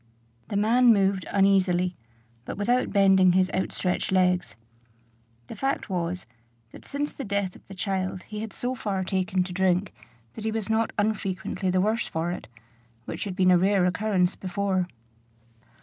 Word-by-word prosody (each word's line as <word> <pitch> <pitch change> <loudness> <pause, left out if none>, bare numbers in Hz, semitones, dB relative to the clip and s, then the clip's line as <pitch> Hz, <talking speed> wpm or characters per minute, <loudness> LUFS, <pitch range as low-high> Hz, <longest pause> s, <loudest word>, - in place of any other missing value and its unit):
The 205 - -2
man 235 +4 +5
moved 195 -3 +2
uneasily, 185 -2 +2 0.5
but - - -6
without 245 +5 +1
bending 190 -2 +5
his 185 0 +2
outstretched 185 -1 -1
legs. 180 -1 +2 0.9
The - - -9
fact 270 -6 -2
was, 180 0 -2 0.5
that - - -13
since 290 +1 -3
the 275 - -6
death 200 -3 -2
of - - -17
the 195 - -10
child 185 -1 -2
he 210 -1 -7
had 220 0 -5
so 245 +1 -3
far 200 -6 -2
taken 185 0 0
to 180 0 -7
drink 185 0 +1 0.4
that 220 - -8
he 220 - -1
was 220 -1 -2
not 225 0 +2
unfrequently 195 -3 -1
the 185 0 +2
worse 220 +4 0
for 165 +2 -2
it; 180 - -6 0.6
which - - -4
had 190 -3 -4
been 185 -1 +4
a 180 - +6
rare 190 0 +3
occurrence 185 -1 +1
before. 185 -1 -1
190 Hz, 165 wpm, -26 LUFS, 185-210 Hz, 0.9 s, a